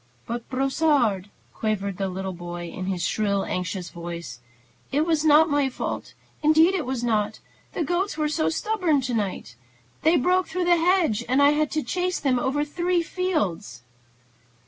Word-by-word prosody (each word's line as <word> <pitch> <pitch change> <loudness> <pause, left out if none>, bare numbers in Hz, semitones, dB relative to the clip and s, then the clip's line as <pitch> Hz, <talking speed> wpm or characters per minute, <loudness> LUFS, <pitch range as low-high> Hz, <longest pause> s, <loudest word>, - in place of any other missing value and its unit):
"But, 235 0 -5
Brossard," 265 - +1 0.2
quavered 200 -3 -2
the 195 -1 -1 0.3
boy 175 0 -6
in 185 +2 -6
his 185 -3 -2
shrill, 200 0 0
anxious 180 0 -3
voice, 170 -7 -7 0.5
"it 295 +3 +2
was 320 -2 +1
not 310 +1 +6
my 290 -3 +1
fault, 255 - -5 0.3
indeed 315 +4 +5
it 350 -9 -2
was 255 -2 -2
not. 215 -2 0 0.3
The 335 - -1
goats 350 +3 -1
were 305 -1 +1
so 315 +1 0
stubborn 360 -6 +1
to 250 -1 -3
night. 200 - -3 0.5
They 320 +2 +4
broke 360 +5 +2
through 360 +2 -2
the 350 0 +5
hedge, 330 - +2
and 260 +2 +3
I 285 0 +6
had 300 0 +1
to 310 -1 0
chase 365 0 -1
them 260 -4 +1
over 280 +4 0
three 345 +3 0
fields." 250 - -2
275 Hz, 165 wpm, -24 LUFS, 200-325 Hz, 0.5 s, not